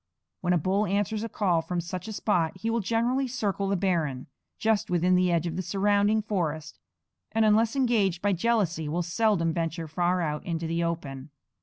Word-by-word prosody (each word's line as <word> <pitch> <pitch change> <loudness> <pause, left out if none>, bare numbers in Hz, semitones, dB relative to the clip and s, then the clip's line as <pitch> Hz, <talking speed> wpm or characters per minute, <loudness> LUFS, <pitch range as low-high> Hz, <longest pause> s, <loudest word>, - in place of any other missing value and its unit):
When 180 - -1
a - - +4
bull 195 +6 +1
answers 205 +3 -1
a 230 - -4
call 180 -7 +1
from 175 +2 -3
such 180 +3 -5
a - - -5
spot 185 -5 0
he 225 +4 -2
will 230 - +1
generally 235 +6 0
circle 205 -6 -2
the 200 - +1
barren, 165 -9 -1 0.3
just 220 -2 +1
within 180 +1 +2
the 180 0 +3
edge 170 -1 +1
of 170 -1 -3
the - - 0
surrounding 205 +3 +2
forest, 160 -7 -3 0.5
and 225 0 +3
unless 220 +3 +3
enraged 220 -9 +2
by 200 +1 +1
jealousy 180 -6 0
will 175 +3 -1
seldom 170 -2 +1
venture 165 0 -3
far 175 +3 0
out 150 -2 -2
into 165 -1 -3
the 165 +1 -1
open. 145 -5 -4
185 Hz, 190 wpm, -27 LUFS, 165-215 Hz, 0.5 s, a